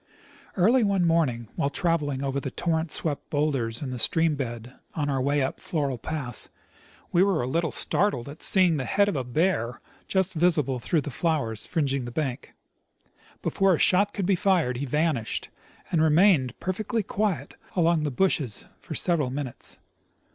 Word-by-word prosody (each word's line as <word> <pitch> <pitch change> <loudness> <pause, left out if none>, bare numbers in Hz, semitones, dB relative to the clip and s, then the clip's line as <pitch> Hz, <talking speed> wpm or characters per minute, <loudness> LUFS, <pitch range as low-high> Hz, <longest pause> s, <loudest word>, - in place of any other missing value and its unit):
Early 230 +7 +4
one 195 -4 +2
morning, 145 -9 +1
while 140 - 0
traveling 145 -4 -1
over 140 0 -1
the 135 - -4
torrent 160 +2 -1
swept 150 -2 -2
bowlders 135 -6 -1
in 130 - -4
the 125 - -5
stream 160 +7 +2
bed 120 -2 -5 0.2
on 145 -2 -1
our 135 -1 0
way 140 +1 +1
up 130 - -3
Floral 140 -6 -2
pass, 130 -4 -3 0.6
we 175 - +4
were 190 -8 +2
a - - -2
little 165 +4 0
startled 145 - 0
at 145 +3 -10
seeing 180 -5 +3
the 130 - -2
head 200 - +2
of 205 - -1
a 130 - -1
bear 125 -3 0 0.3
just 190 -1 0
visible 155 -7 +2
through 155 +6 0
the 145 - -6
flowers 130 -8 -1
fringing 140 -6 0
the 120 - -6
bank. 135 -2 -4 0.9
Before 195 -2 +3
a - - -3
shot 200 +5 +4
could 195 - -3
be 195 - +3
fired, 175 -9 +2
he 140 +2 -3
vanished, 150 -4 -1 0.4
and 165 - +2
remained 160 - +4
jDerfectly 210 +3 -2
quiet 205 -3 -1 0.2
among 170 -2 +3
the 150 - 0
bushes 140 - 0
for - - -7
several 160 -7 +1
minutes. 130 -1 -6
155 Hz, 170 wpm, -26 LUFS, 130-175 Hz, 0.9 s, Early